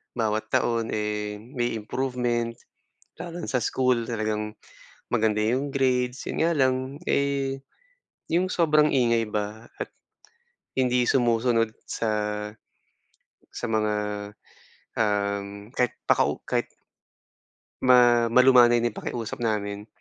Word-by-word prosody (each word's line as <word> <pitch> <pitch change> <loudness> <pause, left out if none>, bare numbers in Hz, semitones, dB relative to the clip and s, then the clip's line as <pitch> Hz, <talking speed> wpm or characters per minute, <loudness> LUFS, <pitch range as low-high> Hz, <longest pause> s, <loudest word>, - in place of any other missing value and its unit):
Bawat 110 -2 -1
taon, 115 -1 +1
eh, 105 0 -2
may 120 -2 -2
improvement, 120 0 -2 0.6
lalo 175 0 -7
na 175 - -5
sa 125 -3 0
school, 125 0 +1
talagang 105 -1 -2 0.6
maganda 110 -2 +2
'yong 125 +7 0
grades, 130 -2 0
'yon - - -2
nga 165 +1 +3
lang, 130 0 +1
eh, 135 -1 0 0.7
'yong 180 +3 +2
sobrang 155 -4 +3
ingay 115 -5 +2
ba 105 +2 -4
at - - -6 0.9
hindi 125 -1 +3
sumusunod 115 -2 +2 0.2
sa 115 - -1 1.4
sa - - -4
mga, 105 -1 +1 1.1
um, 100 0 -1
kahit 125 -3 0 0.2
pakau - - +2
kahit - - -1 1.2
ma 120 -2 +6
malumanay 120 -1 +6
na 120 - +1
'yung - - -11
pakiusap 115 -3 -4
namin, 105 -2 -2
120 Hz, 110 wpm, -25 LUFS, 110-130 Hz, 1.4 s, ma